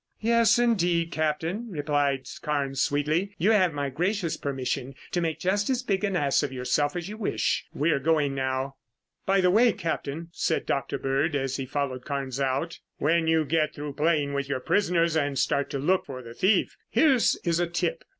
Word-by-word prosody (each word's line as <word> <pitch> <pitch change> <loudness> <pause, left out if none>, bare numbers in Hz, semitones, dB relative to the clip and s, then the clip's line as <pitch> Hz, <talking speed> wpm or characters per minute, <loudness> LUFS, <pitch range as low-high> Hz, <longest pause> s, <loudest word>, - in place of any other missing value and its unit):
"Yes 230 0 +4
indeed, 175 -8 +2
Captain," 160 +8 -1
replied 145 -5 0 0.2
Carnes 140 -3 -1
sweetly. 155 +8 0
"You 195 +7 +3
have 190 -5 +4
my 140 -2 -3
gracious 180 +4 -1
permission 135 -1 -3 0.2
to 175 - 0
make 165 -2 -1
just 200 +4 0
as 255 -1 0
big 200 -4 -1
an 200 -2 0
ass 140 -5 +2
of 145 -3 -2
yourself 135 +4 0
as 175 0 -4
you 210 +2 -7
wish. 110 - -1
We're 150 -1 +1
going 150 -1 +1
now." 130 0 -2 0.5
"By 195 0 +3
the 180 -1 +4
way, 230 +4 +5
Captain," 165 -3 -4
said - - -1
Dr. 140 - -1
Bird 140 +4 0
as 135 -1 -1
he 135 -1 -4
followed 130 -2 -3
Carnes 135 -2 -3
out. 135 +5 -1 0.2
"When 165 +2 +2
you 160 -1 +3
get 155 +1 0
through 145 -1 -5
playing 150 -1 +1
with 140 0 -2
your 135 -2 -1
prisoners 170 +1 +1
and 145 -3 0
start 140 +2 +1
to - - -3
look 180 +8 +1
for 130 -2 -7
the 115 0 -10
thief, 190 - +2
here 310 -3 +4
is 175 -8 +1
a 175 - +1
tip. 485 - -2
155 Hz, 190 wpm, -26 LUFS, 140-180 Hz, 0.5 s, way